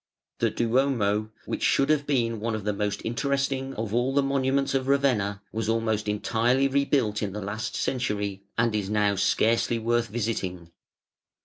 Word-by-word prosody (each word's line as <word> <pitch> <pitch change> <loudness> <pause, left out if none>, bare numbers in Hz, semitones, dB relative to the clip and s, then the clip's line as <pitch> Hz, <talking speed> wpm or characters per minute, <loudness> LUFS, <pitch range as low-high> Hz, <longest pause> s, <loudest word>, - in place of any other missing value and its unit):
The - - +2
Duomo, 115 -4 +1 0.2
which - - -4
should 140 +2 +3
have 145 -2 +1
been 115 -5 +1
one 115 +1 -2
of 110 - -5
the 105 0 0
mosf 100 0 -2
interesting 135 +2 -1
of 110 -1 -4
all 125 +3 +1
the 140 - +4
monuments 135 0 +1
of 135 -1 0
Ravenna, 115 -8 +1
was 110 0 -2
almost 110 -1 0
entirely 120 +5 +2
rebuilt 135 -6 +1
in 100 -3 -2
the 105 - -4
last 100 +2 -4
century, 105 -6 -2 0.2
and 115 -1 +2
is 100 -2 -1
now 105 -1 +2
scarcely 110 +4 +2
worth 120 +1 +1
visiting. 95 -6 -3
115 Hz, 165 wpm, -26 LUFS, 105-135 Hz, 0.2 s, the